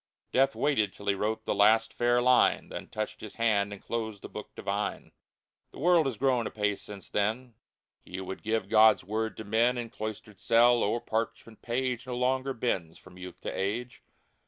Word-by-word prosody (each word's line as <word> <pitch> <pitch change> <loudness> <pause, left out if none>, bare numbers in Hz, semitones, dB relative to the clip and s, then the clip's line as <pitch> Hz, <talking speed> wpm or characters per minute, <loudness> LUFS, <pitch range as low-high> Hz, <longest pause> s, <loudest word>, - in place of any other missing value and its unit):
Death 135 +1 +3
waited 120 -9 +1
till 100 - -12
he 100 - +3
wrote 105 +3 -2
the - - 0
last 110 +2 +4
fair 120 0 +2
line. 125 0 +4
Then - - -7
touched 110 0 -5
his 110 - -9
hand 105 -3 +1
and 100 - -7
closed 110 -3 -4
the - - -7
Book - - -9
Divine! - - -3 0.6
The - - -15
world 170 -1 +4
has 125 -5 -3
grown 125 -2 +1
apace 105 -1 -1
since 100 -2 -10
then. 110 +4 -1 0.5
He 90 - -9
who 95 - -4
would 95 +1 -7
give 110 -2 -1
GOD's 110 +1 +5
word 110 +3 -3
to 110 - -6
men, 115 +4 +2
In 115 -2 -5
cloistered 110 -3 -7
cell, 120 +1 +4
o'er 115 +3 0
parchment 115 -1 -4
page, 125 +1 -2
No 125 -1 -3
longer 130 +1 0
bends 95 -9 -2
from 90 0 -16
youth 90 -1 -9
to - - -4
age. 115 +6 -3
110 Hz, 190 wpm, -29 LUFS, 105-125 Hz, 0.6 s, GOD's